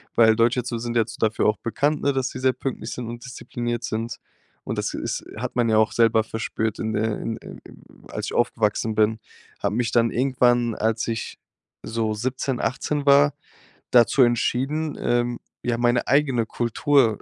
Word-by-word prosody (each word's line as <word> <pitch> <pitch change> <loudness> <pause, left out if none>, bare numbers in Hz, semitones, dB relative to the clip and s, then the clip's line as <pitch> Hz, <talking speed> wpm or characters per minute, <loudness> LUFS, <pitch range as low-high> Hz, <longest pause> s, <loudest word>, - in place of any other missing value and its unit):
weil 110 -1 +6
Deutsche 120 +2 +3
so 120 -1 -3
sind 120 0 -4
jetzt 115 0 -1
dafür 110 0 +1
auch 110 - +2
bekannt, 145 +6 0
ne, 140 - +2
dass 130 -1 -1
sie 130 - -7
sehr 130 0 +2
pünktlich 130 0 -5
sind 120 -2 -5
und 120 0 -8
diszipliniert 120 -2 -4
sind.“ 115 +1 -3 0.5
Und - - -3
das - - -2
ist - - -3
hat - - -4
man 120 -2 +2
ja 110 - +3
auch 110 0 +3
selber 115 -1 +4
verspürt 110 -1 -3
in 110 - -2
der 110 0 -1
in 115 - -3
in - - -11
in - - -15 0.3
als - - -4
ich - - -5
aufgewachsen 110 -1 +1
bin, 110 +1 +2 0.4
habe 100 0 0
mich 120 -1 0
dann 115 -1 +3
irgendwann, 120 -2 +2
als 110 +1 0
ich 115 -1 -4 0.5
so 110 -1 -1
17, 130 +3 -2
18 140 +4 -1
war, 145 0 +6 0.6
dazu 120 +2 +5
entschieden, 135 +6 0
ähm, 120 0 0 0.2
ja, 120 -1 0
meine 120 +1 +1
eigene 135 -5 +2
Kultur 120 0 +2
120 Hz, 180 wpm, -23 LUFS, 110-130 Hz, 0.6 s, weil